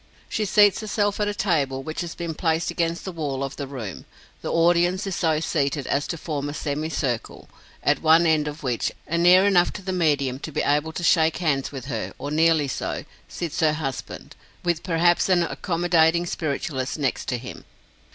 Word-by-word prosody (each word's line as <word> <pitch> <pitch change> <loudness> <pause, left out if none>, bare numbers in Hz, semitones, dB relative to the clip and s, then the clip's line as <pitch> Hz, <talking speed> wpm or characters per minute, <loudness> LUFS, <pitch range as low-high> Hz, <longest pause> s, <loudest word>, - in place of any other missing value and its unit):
She 215 - -1
seats 205 0 +5
herself 205 -1 -1
at 210 - +1
a 205 - -1
table, 145 -10 0
which 155 +3 -4
has 170 -1 -5
been 170 -1 -4
placed 160 +1 0
against 170 0 -2
the 190 - -4
wall 145 -5 -3
of 135 - -4
the 140 - -4
room. 125 -7 -7 0.4
The - - -3
audience 175 +3 +3
is 195 -2 -3
so 160 -3 +1
seated 145 -3 -1
as 145 +1 0
to 170 - -3
form 145 -3 -3
a 145 - -6
semicircle, 145 -5 -3 0.4
at - - +2
one 165 +1 +5
end 155 -2 +2
of 150 +1 -6
which, 125 -3 -1
and 170 +1 -1
near 180 +2 +7
enough 180 -3 +4
to 195 - -8
the 185 0 -3
medium 145 -7 +1
to 155 - -7
be - - -1
able 150 +2 +1
to 175 - -5
shake 160 -2 +3
hands 145 -6 0
with 135 -3 -7
her, 135 - -4
or 145 - -5
nearly 160 -1 +3
so, 130 - -4 0.2
sits 170 -4 -5
her 155 -2 +3
husband, 145 -4 -6 0.3
with 175 -2 0
perhaps 175 +1 +2
an 180 -2 +4
accommodating 170 -1 +2
spiritualist 140 -5 -3
next 135 -4 -2
to 125 - -1
him. 125 +2 -9
160 Hz, 195 wpm, -24 LUFS, 145-175 Hz, 0.4 s, near